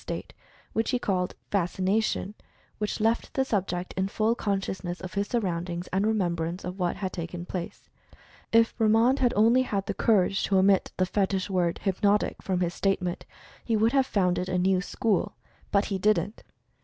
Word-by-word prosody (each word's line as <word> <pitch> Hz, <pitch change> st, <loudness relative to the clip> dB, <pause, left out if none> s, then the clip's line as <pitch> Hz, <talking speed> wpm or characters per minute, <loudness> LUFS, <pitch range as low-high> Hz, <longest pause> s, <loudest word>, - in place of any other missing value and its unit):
state," -, -, -6 dB, 0.4 s
which 225 Hz, -, 0 dB
he 250 Hz, -, +2 dB
called 185 Hz, -6 st, -1 dB, 0.2 s
"Fascination," 195 Hz, +2 st, 0 dB, 0.5 s
which 210 Hz, +1 st, -2 dB
left 225 Hz, +2 st, 0 dB
the 265 Hz, -, +2 dB
subject 185 Hz, -6 st, -2 dB
in 190 Hz, 0 st, 0 dB
full 215 Hz, +3 st, +1 dB
conscious 195 Hz, -4 st, -2 dB
ness 175 Hz, 0 st, -4 dB
of 185 Hz, -1 st, -8 dB
his 200 Hz, 0 st, -1 dB
surroundings, 175 Hz, -6 st, -2 dB
and 195 Hz, +3 st, +2 dB
remembrance 175 Hz, -4 st, -1 dB
of 180 Hz, +2 st, -6 dB
what 175 Hz, -1 st, 0 dB
had 190 Hz, -2 st, -4 dB
taken 175 Hz, 0 st, -5 dB
place. 180 Hz, -1 st, -6 dB, 0.6 s
If 230 Hz, 0 st, +4 dB
Bremand 225 Hz, +4 st, +3 dB
had 245 Hz, -2 st, +3 dB
only 230 Hz, +5 st, +5 dB
had 200 Hz, -6 st, -2 dB
the -, -, -2 dB
cour 205 Hz, -5 st, +3 dB
age 195 Hz, -, -2 dB
to 195 Hz, -, +2 dB
omit 190 Hz, 0 st, +3 dB
the 185 Hz, -, +2 dB
fetich 195 Hz, 0 st, -1 dB
word 175 Hz, -2 st, 0 dB
"hypnotic" 205 Hz, +1 st, +1 dB
from 185 Hz, -2 st, -1 dB
his 175 Hz, -1 st, 0 dB
state 195 Hz, -1 st, 0 dB
ment, 175 Hz, -1 st, -4 dB, 0.4 s
he 225 Hz, -2 st, +1 dB
would 220 Hz, +2 st, +3 dB
have 270 Hz, -2 st, +3 dB
founded 180 Hz, -3 st, 0 dB
a 180 Hz, -, 0 dB
new 185 Hz, 0 st, +2 dB
school. 210 Hz, 0 st, -1 dB, 0.4 s
But 200 Hz, 0 st, +3 dB
he 195 Hz, -2 st, -2 dB
didn't! 205 Hz, 0 st, +1 dB
195 Hz, 180 wpm, -27 LUFS, 180-215 Hz, 0.6 s, only